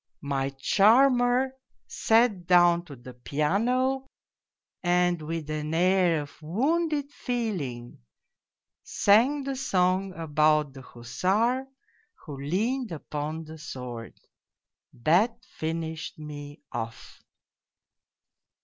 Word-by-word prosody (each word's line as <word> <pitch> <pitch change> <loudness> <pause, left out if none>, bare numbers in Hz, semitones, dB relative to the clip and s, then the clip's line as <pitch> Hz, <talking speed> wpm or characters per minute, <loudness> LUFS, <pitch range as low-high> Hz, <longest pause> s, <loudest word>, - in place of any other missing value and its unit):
My 135 -1 -1
charmer 245 - +3 0.3
sat 220 -6 +2
down 175 -1 +5
to 145 - -10
the 125 0 -12
piano 235 - 0 0.7
and 175 -1 +2
with 160 0 -4
an 155 +1 -3
air 180 -3 +3
of 145 +2 -15
wounded 285 - 0
feeling 185 - -4 0.8
sang 250 +8 +3
the 275 0 -3
song 185 -5 +1
about 155 -2 +2
the 135 - -10
hussar 195 - -1 0.6
who 150 -4 -7
leaned 215 - -1
upon 155 0 -5
the 160 0 -11
sword 125 -5 -8 0.9
that 215 +9 +4
finished 160 -5 -5
me 145 -1 -9
off 115 0 -7
175 Hz, 95 wpm, -27 LUFS, 150-230 Hz, 0.9 s, down